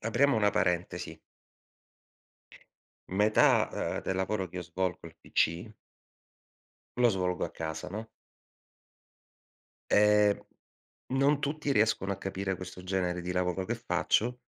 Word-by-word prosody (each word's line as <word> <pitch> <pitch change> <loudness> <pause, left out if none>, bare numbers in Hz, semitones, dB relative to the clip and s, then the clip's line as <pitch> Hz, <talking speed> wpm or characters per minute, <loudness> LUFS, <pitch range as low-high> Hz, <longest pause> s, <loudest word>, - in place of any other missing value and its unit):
apriamo 120 +4 +2
una 105 -2 +3
parentesi 90 -3 -1 1.9
metà, 105 +3 +4
uhm, - - -2
del 95 - -2
lavoro 95 0 -1
che 90 - -11
io 90 - -3
svolgo 90 +1 -2
al 85 -1 -11
PC 85 +7 0 1.3
lo 120 -1 +5
svolgo 90 -2 -1
a - - -6
casa, 80 +2 -5
no. 110 +3 -6 1.8
Ehm, 105 0 +4 0.7
non 140 +2 +2
tutti 145 0 -1
riescono 105 -4 +2
a 95 - -8
capire 95 0 -3
questo 90 0 -9
genere 90 -1 -1
di 90 +1 -4
lavoro 90 +1 -1
che - - -2
faccio, 125 +3 0
95 Hz, 120 wpm, -30 LUFS, 90-110 Hz, 1.9 s, lo